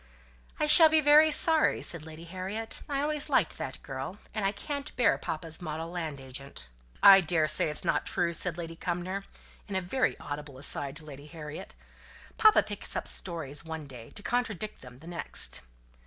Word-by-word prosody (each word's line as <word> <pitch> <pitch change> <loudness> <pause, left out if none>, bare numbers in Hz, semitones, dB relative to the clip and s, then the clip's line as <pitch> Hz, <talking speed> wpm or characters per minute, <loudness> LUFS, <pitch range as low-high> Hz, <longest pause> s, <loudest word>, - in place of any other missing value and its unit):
"I - - +2
shall 320 +1 +9
be 315 0 +4
very 305 +1 +6
sorry," 315 +1 +3
said 160 -2 -3
Lady 160 +1 -10
Harriet. 190 +6 -5
"I 280 -1 0
always 300 0 -2
liked - - +1
that - - -6
girl; - - -6 0.2
and 215 - -2
I 195 - +2
can't 280 +7 -6
bear 245 - +4
papa's 160 +1 -5
model 160 0 -5
land 160 -5 -4
agent." 135 +1 -6 0.4
"I 195 -1 +10
daresay 155 -3 +2
it's 150 - -2
not - - 0
true," 170 0 0
said 175 0 0
Lady 165 -1 -6
Cumnor, 180 +3 -3 0.4
in 200 - -5
a - - +3
very 250 +9 0
audible 145 -2 -7
aside 140 +1 0
to 155 -1 -5
Lady 145 -1 -11
Harriet. 150 -1 -9 0.6
"Papa 435 -1 +6
picks 205 -1 -7
up - - -2
stories 160 -5 -2
one 160 -2 -6
day 125 -5 -11
to 205 - -7
contradict 225 -3 -2
them 125 -1 -12
the 150 - -16
next." 175 -1 +1
170 Hz, 180 wpm, -29 LUFS, 155-215 Hz, 0.6 s, I